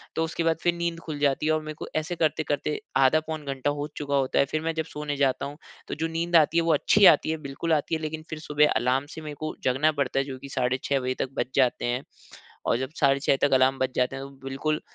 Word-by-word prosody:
तो 160 Hz, -, +1 dB
उसके 165 Hz, +1 st, -2 dB
बाद 165 Hz, -1 st, +2 dB
फिर 175 Hz, -, +2 dB
नींद 170 Hz, -1 st, -3 dB
खुल 155 Hz, -4 st, -6 dB
जाती 145 Hz, 0 st, +1 dB
है। 155 Hz, -, +3 dB
और 155 Hz, 0 st, +1 dB
मेरे 155 Hz, 0 st, -6 dB
को -, -, -6 dB
ऐसे 155 Hz, +3 st, -1 dB
करते 155 Hz, -1 st, +1 dB
करते 150 Hz, +1 st, -1 dB, 0.2 s
आधा 135 Hz, +3 st, +5 dB
पौन 155 Hz, -1 st, -4 dB
घंटा 135 Hz, 0 st, -1 dB
हो 145 Hz, 0 st, -3 dB
चुका 145 Hz, -1 st, -2 dB
होता 135 Hz, -1 st, +1 dB
है। -, -, +5 dB
फिर 155 Hz, +3 st, -2 dB
मैं 165 Hz, +1 st, -1 dB
जब 160 Hz, -1 st, -1 dB
सोने 150 Hz, -2 st, -5 dB
जाता 135 Hz, -2 st, +1 dB
हूँ 145 Hz, +1 st, -7 dB, 0.3 s
तो -, -, -4 dB
जो 160 Hz, +2 st, -1 dB
नींद 165 Hz, +1 st, -2 dB
आती 165 Hz, +1 st, +5 dB
है 170 Hz, -, +4 dB
वो 165 Hz, -1 st, +3 dB
अच्छी 200 Hz, +7 st, +4 dB
आती 175 Hz, -, +6 dB
है 160 Hz, -, -1 dB
बिल्कुल 140 Hz, +4 st, -2 dB
आती 155 Hz, +1 st, 0 dB
है 160 Hz, -, -4 dB
लेकिन 155 Hz, 0 st, -4 dB
फिर 155 Hz, -, -5 dB
सुबह 150 Hz, -1 st, +2 dB
अलार्म 130 Hz, +3 st, +1 dB
से 160 Hz, -, -8 dB
मेरे 150 Hz, -1 st, -7 dB
को 155 Hz, 0 st, -4 dB
जगना 135 Hz, +5 st, +3 dB
पड़ता 140 Hz, -3 st, -1 dB
है 135 Hz, -, 0 dB
जो 135 Hz, -2 st, -6 dB
कि 140 Hz, -, -10 dB
साढ़े 130 Hz, -1 st, 0 dB
6 140 Hz, -1 st, +1 dB
बजे 130 Hz, 0 st, -1 dB
तक 135 Hz, -, -1 dB
बज -, -, +1 dB
जाते 130 Hz, -3 st, +2 dB
हैं। 120 Hz, +2 st, -1 dB, 0.6 s
और -, -, +3 dB
जब 130 Hz, +1 st, -3 dB
साढ़े 140 Hz, -2 st, +4 dB
6 140 Hz, -, +2 dB
तक 145 Hz, -, -3 dB
अलार्म 130 Hz, +1 st, +3 dB
बज 130 Hz, 0 st, 0 dB
जाते 125 Hz, +1 st, +1 dB
हैं 135 Hz, -, -6 dB
तो 140 Hz, -, -10 dB, 0.2 s
बिल्कुल 155 Hz, +3 st, -1 dB
150 Hz, 275 wpm, -26 LUFS, 135-160 Hz, 0.6 s, आती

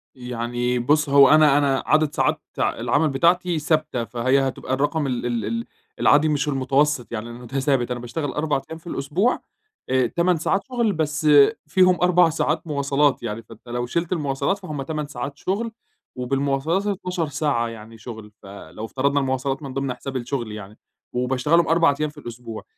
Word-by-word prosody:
يعني 120 Hz, 0 st, -2 dB
بُص 150 Hz, +4 st, +2 dB
هو 140 Hz, -1 st, +7 dB
أنا 150 Hz, -2 st, +6 dB
أنا 140 Hz, -2 st, +1 dB
عدد 155 Hz, -1 st, +2 dB
ساعات -, -, +1 dB, 0.2 s
العمل 155 Hz, +1 st, +1 dB
بتاعتي 170 Hz, +4 st, +2 dB
ثابتة، 155 Hz, -5 st, 0 dB
فهي 130 Hz, +4 st, +1 dB
هتبقى 130 Hz, 0 st, -4 dB
الرقم 145 Hz, +2 st, 0 dB
ال 125 Hz, -2 st, -2 dB
ال 120 Hz, -2 st, -1 dB
ال 230 Hz, 0 st, -3 dB, 0.3 s
العادي 150 Hz, +2 st, +4 dB
مش 150 Hz, -1 st, 0 dB
المتوسط 135 Hz, -1 st, +1 dB
يعني 115 Hz, +1 st, -5 dB
المت 120 Hz, +2 st, -10 dB
ثابت 135 Hz, -3 st, +1 dB
أنا 120 Hz, -, -2 dB
باشتغل 140 Hz, +4 st, -4 dB
4 150 Hz, -2 st, -1 dB
أيام 160 Hz, -, -6 dB
في 170 Hz, -, -17 dB
الأسبوع، 170 Hz, -, 0 dB, 0.5 s
آآ 130 Hz, -2 st, +2 dB
8 175 Hz, +5 st, +1 dB
ساعات 195 Hz, +5 st, 0 dB
شغل، 235 Hz, -5 st, 0 dB
بس 150 Hz, -1 st, -1 dB, 0.4 s
فيهم 180 Hz, +2 st, +3 dB
4 180 Hz, -1 st, +5 dB
ساعات 160 Hz, +1 st, -1 dB
مواصلات 140 Hz, -2 st, +1 dB
يعني، 115 Hz, 0 st, -4 dB
فأنت 115 Hz, +2 st, -16 dB
لو 120 Hz, 0 st, -2 dB
شِلت 170 Hz, +7 st, -2 dB
المواصلات 145 Hz, +2 st, 0 dB
فهُم 150 Hz, -7 st, -5 dB
8 150 Hz, +1 st, -4 dB
ساعات 140 Hz, +1 st, -6 dB
شغل، 220 Hz, +7 st, -2 dB, 0.5 s
وبالمواصلات 140 Hz, +9 st, 0 dB
12 180 Hz, -4 st, -2 dB
ساعة 135 Hz, -4 st, 0 dB
يعني 115 Hz, 0 st, -10 dB
شغل، 110 Hz, -1 st, -9 dB
فلو 100 Hz, +2 st, -9 dB
افترضنا 140 Hz, +4 st, 0 dB
المواصلات 135 Hz, +2 st, -2 dB
من 135 Hz, -2 st, -6 dB
ضمن 135 Hz, -1 st, -2 dB
حساب 135 Hz, +2 st, -7 dB
الشغل 120 Hz, -2 st, -3 dB
يعني، 105 Hz, 0 st, -9 dB, 0.4 s
وباشتغلهم 130 Hz, +7 st, +2 dB
4 165 Hz, -3 st, +4 dB
أيام 155 Hz, -1 st, 0 dB
في 150 Hz, -, -19 dB
الأسبوع، 120 Hz, -4 st, -8 dB
140 Hz, 170 wpm, -23 LUFS, 125-155 Hz, 0.5 s, هو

